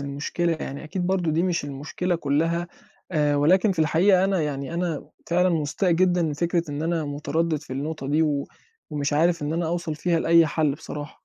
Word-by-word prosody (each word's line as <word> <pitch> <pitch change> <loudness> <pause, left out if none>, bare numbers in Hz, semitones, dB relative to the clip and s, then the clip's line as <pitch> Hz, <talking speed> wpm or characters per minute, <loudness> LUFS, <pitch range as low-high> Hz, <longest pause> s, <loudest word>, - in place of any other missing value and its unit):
المشكلة 145 +5 -2
يعني، 140 +3 -6
أكيد 175 +3 -3
برضه 180 -4 +1
دي 165 +3 +1
مش 180 -5 0
المشكلة 150 +6 -3
كلّها 165 +4 0 0.4
آآ، 150 -2 +2
ولكن 185 +7 +4
في 175 - -11
الحقيقة 180 +4 +4
أنا 190 -4 +1
يعني 140 +1 -3
أنا 170 -4 -2 0.2
فعلًا 180 +2 +3
مستاء 165 +3 0
جدًا 180 0 +3
من 155 - 0
فكرة 170 +1 -1
إن 145 +1 -3
أنا 165 -1 0
متردِّد 150 +2 -1
في 150 - -10
النقطة 145 +1 -4
دي 155 +2 +3
و 145 -3 0 0.4
ومش 145 -1 -2
عارف 165 +1 +2
إن 145 +2 -2
أنا 170 0 -1
أوصل 170 -1 -2
فيها 165 +2 0
لأي 165 0 +5
حَل 150 -1 +1
بصراحة. 150 -1 -8
160 Hz, 190 wpm, -24 LUFS, 145-175 Hz, 0.4 s, لأي